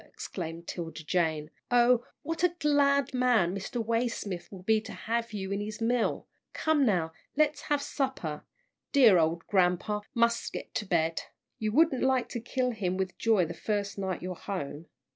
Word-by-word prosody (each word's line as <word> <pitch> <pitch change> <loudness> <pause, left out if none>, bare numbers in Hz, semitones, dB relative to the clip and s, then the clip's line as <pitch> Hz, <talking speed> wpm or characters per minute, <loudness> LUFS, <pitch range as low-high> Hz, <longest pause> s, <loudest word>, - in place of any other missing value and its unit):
exclaimed 170 -2 -6
'Tilda 165 -2 -5
Jane. 160 -2 0 0.2
"Oh, 245 0 +4 0.2
what 330 +3 -3
a 355 -1 +3
glad 280 -3 +3
man 245 -9 +3
Mr. 220 +4 -3
Waysmith 230 -5 -2
will 190 -2 -10
be 220 +2 +3
to - - -9
have 230 0 -2
you 195 -2 -4
in 200 +1 -1
his 210 0 -5
mill! 235 +1 0 0.3
Come 305 -4 +2
now, 165 -6 +1 0.2
let's 305 -1 +2
have 290 -1 +2
supper. 260 - -3 0.5
Dear 235 - +7
ole 165 +1 +1
grampa 190 +2 +1
mus' 235 0 +2
get - - -7
to 210 - -2
bed. 165 -2 +1 0.4
You 215 -1 -1
wouldn't 295 +1 +3
like 260 -2 +2
to 240 - -4
kill 250 +2 -1
him 185 -5 -2
with 190 -1 -2
joy 220 -6 +3
the 165 - -5
first 205 -2 -2
night 190 -2 -3
you're 185 0 -3
home." 165 -4 -5
215 Hz, 170 wpm, -29 LUFS, 180-250 Hz, 0.5 s, Dear